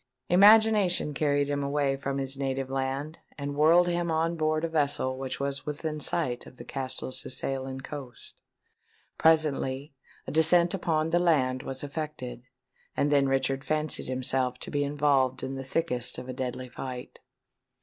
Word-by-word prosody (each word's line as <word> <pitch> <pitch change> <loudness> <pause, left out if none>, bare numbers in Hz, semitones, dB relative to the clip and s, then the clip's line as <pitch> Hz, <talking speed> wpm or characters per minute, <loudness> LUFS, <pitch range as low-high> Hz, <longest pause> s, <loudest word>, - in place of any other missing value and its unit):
Imagination 205 -4 +5
carried 145 -1 +1
him 145 0 -1
away 140 -1 0
from 140 0 -3
his 135 0 -1
native 135 -1 -3
land, 135 +4 -3 0.2
and 140 -1 -4
whirled 165 +4 +5
him 175 -1 -1
on 165 +1 0
board 155 0 0
a - - +1
vessel 145 -4 0
which 130 0 -5
was 140 +1 -3
within 150 +1 -3
sight 125 -4 0
of 125 - -15
the 120 - -10
Castelcicalan 130 0 -2
coasts. 130 -4 -9 0.9
Presently 145 -3 +2 0.3
a - - -5
descent 170 +2 +4
upon 165 -4 0
the 175 - +3
land 130 -7 +2
was 130 +1 -5
effected; 145 -4 -5 0.6
and 145 - +2
then 140 -2 +3
Richard 135 0 0
fancied 155 0 -1
himself 130 0 0
to - - -6
be 145 0 0
involved 140 -2 +1
in 135 - -3
the 135 0 -5
thickest 130 -3 -2
of 125 - -7
a 130 - -5
deadly 130 0 -4
fight. 125 0 -7
140 Hz, 155 wpm, -28 LUFS, 130-155 Hz, 0.9 s, Imagination